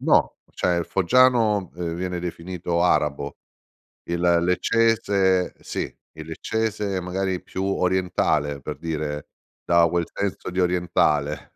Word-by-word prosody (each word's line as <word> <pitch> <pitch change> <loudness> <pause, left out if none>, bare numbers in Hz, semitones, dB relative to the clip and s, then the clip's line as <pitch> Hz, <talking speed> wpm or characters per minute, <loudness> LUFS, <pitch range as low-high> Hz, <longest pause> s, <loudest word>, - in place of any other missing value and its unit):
No, - - +5 0.3
o - - -31
cioè 90 -1 +1
il 85 - -1
foggiano, 110 -1 +3
ehm, 85 -2 -3
viene 90 +1 -3
definito 85 0 -3
arabo, 70 -5 +1 0.7
il 85 0 -3 0.2
leccese 100 -1 +2
sì - - -4 0.2
il 80 0 -10
leccese 105 +2 -2
magari 90 0 -2
più 95 - -4
orientale, 90 -6 0
per 75 +3 -6
dire, 75 -3 -4 0.4
dà 85 -1 +5
quel 85 0 0
senso 100 -2 -3
di 90 +1 -1
orientale. 75 -5 +1
90 Hz, 125 wpm, -24 LUFS, 85-95 Hz, 0.7 s, No